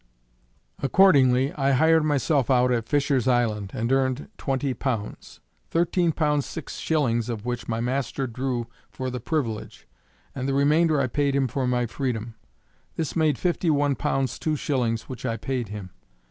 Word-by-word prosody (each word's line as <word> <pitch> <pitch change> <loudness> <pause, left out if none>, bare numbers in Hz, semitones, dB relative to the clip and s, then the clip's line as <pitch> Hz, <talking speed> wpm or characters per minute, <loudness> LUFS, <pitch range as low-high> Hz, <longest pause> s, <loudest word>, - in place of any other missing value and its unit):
Accordingly, 135 -4 +4
I 140 -1 +1
hired 160 +4 +4
myself 145 -3 +1
out 125 -1 +4
at 115 -2 0
Fisher's 140 -3 +1
Island, 110 -5 +1
and 115 +3 -1
earned 135 0 0
twenty 135 -1 -1
pounds; 120 -6 -4 0.3
thirteen 170 0 +2
pounds 150 -3 0
six 165 -5 -7
shillings 120 -7 0
of 115 -2 -4
which 120 -1 -3
my 115 -1 -2
master 130 +2 -1
drew 125 0 -3 0.2
for 130 -1 -5
the 125 - -4
privilege, 120 -5 -3 0.5
and 135 0 -3
the 135 - 0
remainder 150 +2 +3
I 140 - +2
paid 140 +2 0
him 135 -1 +2
for 130 +1 -2
my 125 -1 +1
freedom. 120 -2 -3 0.6
This 160 -4 -3
made 155 -5 +2
fifty 175 -1 0
one 145 -2 +2
pounds 135 -1 -1
two 155 -1 0
shillings 125 -6 -1
which 130 - -9
I 115 - -1
paid 130 -3 -3
him. 100 -3 -7
130 Hz, 160 wpm, -25 LUFS, 120-145 Hz, 0.6 s, Accordingly